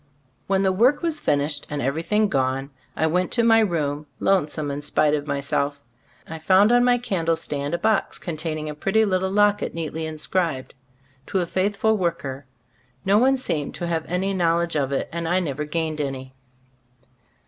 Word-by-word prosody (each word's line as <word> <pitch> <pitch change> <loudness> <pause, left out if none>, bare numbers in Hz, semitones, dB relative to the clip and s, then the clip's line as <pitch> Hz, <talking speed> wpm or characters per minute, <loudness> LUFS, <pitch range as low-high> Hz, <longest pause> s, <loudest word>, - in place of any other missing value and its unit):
When 195 0 +2
the 190 - +3
work 245 - +3
was 325 -3 0
finished 145 - 0
and 150 - -3
everything 165 - +1
gone, 135 -2 -1 0.2
I 160 - +1
went 180 +3 +1
to 235 - +2
my 225 -1 +6
room, 150 -7 -1
lonesome 155 -6 +1
in 140 +1 -4
spite 150 +1 +1
of 150 -1 -1
myself. 140 0 -1 0.5
I 160 0 -7
found 190 +6 +4
on 245 0 +5
my 245 0 +4
candle 175 -9 0
stand 145 0 -2
a - - -1
box 215 +4 0
containing 155 -2 -4
a 150 - -4
pretty 195 +8 +1
little 190 -1 0
locket, 205 -1 +2
neatly 160 -1 -3
inscribed, 155 -3 -2 0.5
"To 190 - 0
a 175 - 0
faithful 205 +5 +1
worker." 140 -6 -3 0.6
No 200 +2 +4
one 265 +3 +4
seemed 155 - -3
to 175 - -4
have 165 -2 -2
any 190 +3 -1
knowledge 170 -2 +1
of 140 -2 0
it, 135 - -1
and 170 0 -3
I 180 +2 +3
never 150 -4 -3
gained 155 0 -2
any. 130 -2 -5
165 Hz, 175 wpm, -23 LUFS, 150-195 Hz, 0.6 s, my